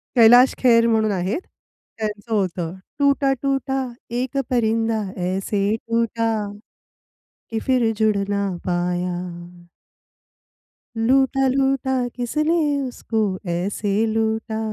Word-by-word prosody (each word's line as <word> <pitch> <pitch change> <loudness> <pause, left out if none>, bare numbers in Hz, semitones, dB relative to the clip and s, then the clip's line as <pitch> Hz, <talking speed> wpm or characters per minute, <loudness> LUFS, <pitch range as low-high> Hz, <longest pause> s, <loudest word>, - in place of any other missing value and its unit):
कैलाश 245 +2 +7
खेर 235 -2 +5
म्हणून 220 -2 +2
आहेत. 190 - -1 0.6
त्यांचं 215 +1 -4
होतं 180 -4 -1 0.3
"टूटा 280 -1 +3
टूटा, 270 -1 0 0.3
एक 250 +3 -2
परिंदा 225 -2 +1 0.3
ऐसे 195 +2 -1
टूटा 230 0 -1 1.2
कि 225 - -1
फ़िर 250 -4 +3
जुड़ 215 -1 +2
ना 200 -1 0 0.2
पाया." 175 -1 -3 1.3
लूटा 265 +3 +3
लूटा, 270 0 +1 0.2
किसने 305 +7 0 0.3
उसको 225 -2 -3 0.3
ऐसे 195 +4 -1
लूटा 220 0 -1
225 Hz, 95 wpm, -22 LUFS, 200-255 Hz, 1.3 s, कैलाश